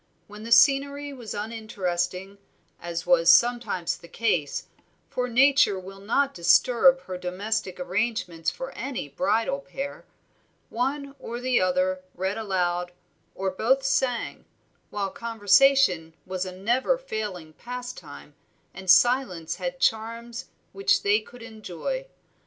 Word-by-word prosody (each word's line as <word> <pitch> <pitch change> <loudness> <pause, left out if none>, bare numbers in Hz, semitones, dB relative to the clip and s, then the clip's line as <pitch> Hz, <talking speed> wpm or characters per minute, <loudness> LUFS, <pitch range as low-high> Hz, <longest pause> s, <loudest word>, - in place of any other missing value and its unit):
When 210 0 -12
the 230 +1 -8
scenery 280 +3 +4
was 240 -5 -7
uninteresting, 195 -3 -3 0.4
as 170 0 -4
was 175 -1 +4
sometimes 235 -4 +3
the 170 - -14
case, 170 -8 -1 0.5
for 250 0 -2
Nature 265 -4 +4
will 195 +1 -11
not 270 +8 0
disturb 255 +9 +4
her 185 -5 -7
domestic 185 +1 -3
arrangements 185 -2 -1
for - - -7
any 260 - -5
bridal 270 - 0
pair, 280 0 -7 0.7
one 275 +3 -2
or 235 -1 -6
the 250 -2 +1
other 185 0 +1
read 190 +2 -2
aloud, 180 -4 -1 0.4
or 190 0 -2
both 260 +8 +1
sang, 260 -3 -1 0.4
while 200 -2 -3
conversation 225 -6 +3
was 185 0 -3
a - - -5
never 240 - +1
failing 205 - -5
pastime 240 -12 -9 0.4
and 190 0 -8
silence 190 -6 +3
had - - -4
charms 230 - -1 0.3
which 195 0 +1
they 205 +1 +4
could 240 +2 -14
enjoy. 225 - -5
215 Hz, 125 wpm, -26 LUFS, 185-250 Hz, 0.7 s, scenery